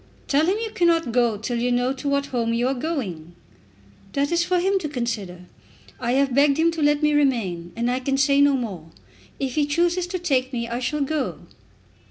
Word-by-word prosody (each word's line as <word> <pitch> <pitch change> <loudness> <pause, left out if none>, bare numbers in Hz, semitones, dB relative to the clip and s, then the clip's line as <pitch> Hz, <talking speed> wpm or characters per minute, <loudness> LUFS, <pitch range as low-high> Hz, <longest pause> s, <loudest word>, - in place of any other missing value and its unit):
"Tell 300 +3 +2
him 385 +3 +2
you 450 -1 -4
cannot 335 - +2
go 235 -3 +2
till 235 +3 -3
you 245 +1 0
know 245 +2 +1
to 280 +1 -4
what 280 0 +1
home 235 -4 -1
you 240 +2 +1
are 265 - +1
going." 215 - -4 0.8
"That 285 +2 0
is 340 0 +2
for 360 0 +1
him 385 +2 +1
to 310 -5 -4
consider. 230 -9 -4 0.6
I 240 0 -1
have 270 -1 +2
begged 280 +1 +4
him 330 +1 +3
to 330 -1 -4
let 295 0 +2
me 300 0 +3
remain, 215 -12 0
and 235 +1 -1
I 255 - 0
can 270 +1 -1
say 275 +1 +3
no 285 0 +5
more. 200 -11 -5 0.5
If 265 -2 -2
he 295 +1 +1
chooses 345 +4 +1
to 365 +1 -3
take 270 -7 0
me, 235 -1 -2
I 235 +1 -3
shall 285 +4 -2
go." 285 0 -2
275 Hz, 215 wpm, -23 LUFS, 240-305 Hz, 0.8 s, no